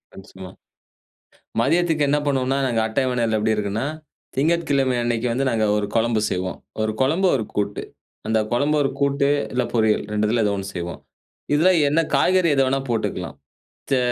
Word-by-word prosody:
Once 95 Hz, -, -13 dB
more. 95 Hz, 0 st, -9 dB, 1.1 s
மதியத்துக்கு 160 Hz, +3 st, +2 dB
என்ன 145 Hz, -, +3 dB
பண்ணுவோம்னா, 135 Hz, -1 st, 0 dB
நாங்க 115 Hz, -3 st, +1 dB
அட்டவணைல 120 Hz, -1 st, 0 dB
எப்டி 110 Hz, +1 st, +1 dB
இருக்குன்னா, 105 Hz, +3 st, -2 dB, 0.5 s
திங்கட்கிழமை 140 Hz, -3 st, +1 dB
அன்னைக்கு 120 Hz, 0 st, -1 dB
வந்து 130 Hz, +4 st, 0 dB
நாங்க 110 Hz, -3 st, +1 dB
ஒரு 105 Hz, -, -1 dB
குழம்பு 115 Hz, -1 st, +2 dB
செய்வோம். 95 Hz, 0 st, -3 dB, 0.2 s
ஒரு 110 Hz, 0 st, 0 dB
குழம்பு, 160 Hz, +9 st, +2 dB
ஒரு 115 Hz, -5 st, -2 dB
கூட்டு. 100 Hz, 0 st, -2 dB, 0.4 s
அந்த 110 Hz, 0 st, +2 dB
குழம்பு, 145 Hz, +5 st, +1 dB
ஒரு 135 Hz, -, +1 dB
கூட்டு 140 Hz, 0 st, +1 dB, 0.3 s
இல்ல 125 Hz, -, +1 dB
பொரியல் 110 Hz, -2 st, +2 dB
2த்துல 105 Hz, +2 st, +1 dB
ஏதோ 100 Hz, -, +1 dB
ஒண்ணு 95 Hz, 0 st, -5 dB
செய்வோம். 85 Hz, 0 st, -5 dB, 0.5 s
இதுல 160 Hz, +5 st, +4 dB, 0.2 s
என்ன 150 Hz, +3 st, +2 dB, 0.2 s
காய்கறி 185 Hz, -2 st, +3 dB
எது 135 Hz, -, +4 dB
வேணா 135 Hz, +1 st, +1 dB
போட்டுக்கலாம். 115 Hz, -2 st, -2 dB, 0.6 s
செ 135 Hz, -, +4 dB
120 Hz, 155 wpm, -22 LUFS, 110-140 Hz, 1.1 s, இதுல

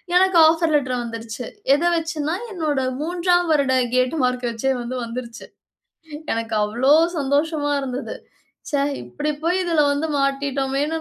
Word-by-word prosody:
எனக்கு 375 Hz, -1 st, +4 dB
offer 325 Hz, -1 st, +2 dB
letter 255 Hz, -4 st, +1 dB
வந்துருச்சு. 230 Hz, +1 st, -6 dB, 0.3 s
எத 295 Hz, +4 st, +1 dB
வெச்சின்னா 320 Hz, 0 st, -2 dB, 0.2 s
என்னுட 305 Hz, -7 st, -1 dB, 0.2 s
3ஆம் 350 Hz, +1 st, +1 dB
வருட 280 Hz, -4 st, +2 dB, 0.2 s
கேட் 255 Hz, +5 st, +2 dB
மார்க் 250 Hz, -1 st, 0 dB
வெச்சே 235 Hz, +4 st, -1 dB
வந்து 250 Hz, +2 st, -4 dB
வந்துருச்சு. 235 Hz, 0 st, -7 dB, 0.9 s
எனக்கு 225 Hz, -1 st, -3 dB
அவ்வளவு 270 Hz, +10 st, +3 dB
சந்தோஷமா 290 Hz, +2 st, 0 dB
இருந்தது. 260 Hz, 0 st, -5 dB, 0.6 s
ச்சே 285 Hz, -2 st, +1 dB, 0.2 s
இப்படி 300 Hz, +1 st, -3 dB
போயி 355 Hz, +3 st, +1 dB
இதில 325 Hz, -3 st, +3 dB
வந்து 305 Hz, +3 st, -1 dB
மாட்டிட்டோமேன்னு 275 Hz, +2 st, -1 dB
285 Hz, 130 wpm, -21 LUFS, 255-320 Hz, 0.9 s, எனக்கு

